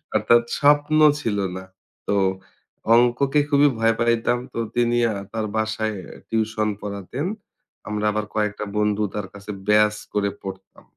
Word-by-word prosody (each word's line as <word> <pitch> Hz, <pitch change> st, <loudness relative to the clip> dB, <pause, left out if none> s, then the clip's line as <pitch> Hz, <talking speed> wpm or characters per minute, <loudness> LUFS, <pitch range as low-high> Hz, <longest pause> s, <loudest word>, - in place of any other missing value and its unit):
অর্থাৎ 120 Hz, 0 st, +4 dB, 0.2 s
স্বপ্ন 145 Hz, +1 st, +4 dB, 0.2 s
ছিল 110 Hz, -6 st, -1 dB, 0.2 s
না। 95 Hz, -, -7 dB, 0.4 s
তো 100 Hz, -, +1 dB, 0.8 s
অংককে 125 Hz, +4 st, +3 dB
খুবই 145 Hz, 0 st, +5 dB
ভয় 115 Hz, 0 st, +3 dB
পাইতাম 115 Hz, +1 st, +2 dB, 0.2 s
তো -, -, -3 dB, 0.2 s
তিনি 120 Hz, 0 st, +2 dB, 0.2 s
আ -, -, -5 dB, 0.2 s
তার 110 Hz, -1 st, -2 dB
বাসায় 110 Hz, 0 st, -1 dB, 0.3 s
টিউশন 110 Hz, -1 st, 0 dB
পড়াতেন। 100 Hz, -, -5 dB, 0.6 s
আমরা 105 Hz, 0 st, -2 dB
আবার 105 Hz, 0 st, -2 dB
কয়েকটা 105 Hz, -1 st, -1 dB
বন্ধু 105 Hz, 0 st, +1 dB
তার 105 Hz, -2 st, -3 dB
কাছে 100 Hz, +1 st, -8 dB, 0.2 s
ব্যাচ 105 Hz, 0 st, +4 dB, 0.2 s
করে 100 Hz, -1 st, +1 dB
পড়তাম। 95 Hz, 0 st, -9 dB
110 Hz, 135 wpm, -23 LUFS, 105-120 Hz, 0.8 s, খুবই